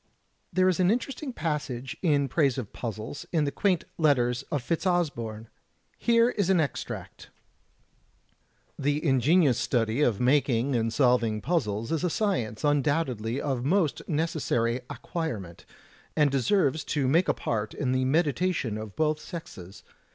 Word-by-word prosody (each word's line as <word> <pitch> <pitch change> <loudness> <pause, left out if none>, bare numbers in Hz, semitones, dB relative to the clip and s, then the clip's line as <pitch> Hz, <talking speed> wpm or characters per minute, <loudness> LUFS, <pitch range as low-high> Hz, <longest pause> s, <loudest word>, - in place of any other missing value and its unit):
There 185 0 +3
is 185 -1 +2
an 180 0 +4
interesting 260 +5 -2
passage 150 - -3
in 145 -5 +2
praise 140 -2 +1
of 120 -6 -5
puzzles, 110 +3 -6
in 160 -3 +2
the 140 - 0
quaint 185 -2 +1 0.2
letters 125 -6 +2
of 145 -6 -1
Fitzosborne. 145 - -1 0.5
Here 235 +1 +4
is 200 -5 -1
an 190 -2 +4
extract: 145 -5 -4 1.5
"The 145 +3 0
ingenious 140 0 +3
study 115 +1 0
of 120 -8 +2
making 130 -1 +2
and 115 -1 0
solving 120 -4 +2
puzzles 115 - -1
is 165 +1 0
a 180 - +2
science 160 - -1
undoubtedly 140 -5 0
of 135 -4 -2
most 160 +1 +1
necessary 145 -7 0
acquirement, 110 - -5 0.5
and 150 -3 +3
deserves 150 - +2
to 140 -3 0
make 165 +7 +3
a - - +3
part 110 -1 -3
in 130 -3 -1
the 130 0 +1
meditation 145 - 0
of 110 -2 -8
both 155 -1 +1
sexes. 100 - -9
140 Hz, 140 wpm, -27 LUFS, 120-165 Hz, 1.5 s, an